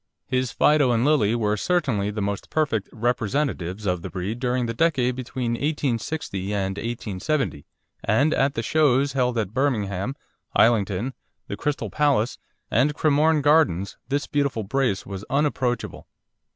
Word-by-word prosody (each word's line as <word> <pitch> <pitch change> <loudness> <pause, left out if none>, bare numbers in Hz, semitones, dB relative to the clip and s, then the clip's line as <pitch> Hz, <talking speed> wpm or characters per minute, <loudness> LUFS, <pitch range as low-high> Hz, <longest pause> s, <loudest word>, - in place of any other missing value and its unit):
His 130 -2 -1
Fido 150 0 +4
and 120 0 +2
Lily 125 -8 +3
were 105 -3 +1
certainly 125 - 0
the 105 0 -3
most 100 0 -3
perfect 135 -10 0
representatives 115 - -1
of 90 -3 0
the - - -6
breed 95 +7 -4
during 125 0 0
the 115 - -2
decade 130 -3 +1
between 125 -1 -3
1860 120 -6 -2
and 95 -1 -1
1870, 115 - -2 0.4
and 140 +9 +3
at 135 +1 +1
the 115 - -2
shows 140 0 +2
held 125 -3 +1
at 105 -3 -2
Birmingham, 115 -4 -1 0.4
Islington, 110 +1 +2 0.3
the - - -4
Crystal 150 -1 -2
Palace, 140 -6 +1 0.3
and 140 +7 +2
Cremorne 155 0 +3
Gardens, 100 - +3
this 145 +1 0
beautiful 140 -6 -1
brace 120 -2 0
was 100 0 -6
unapproachable. 135 -3 -1
125 Hz, 140 wpm, -24 LUFS, 105-145 Hz, 0.4 s, Fido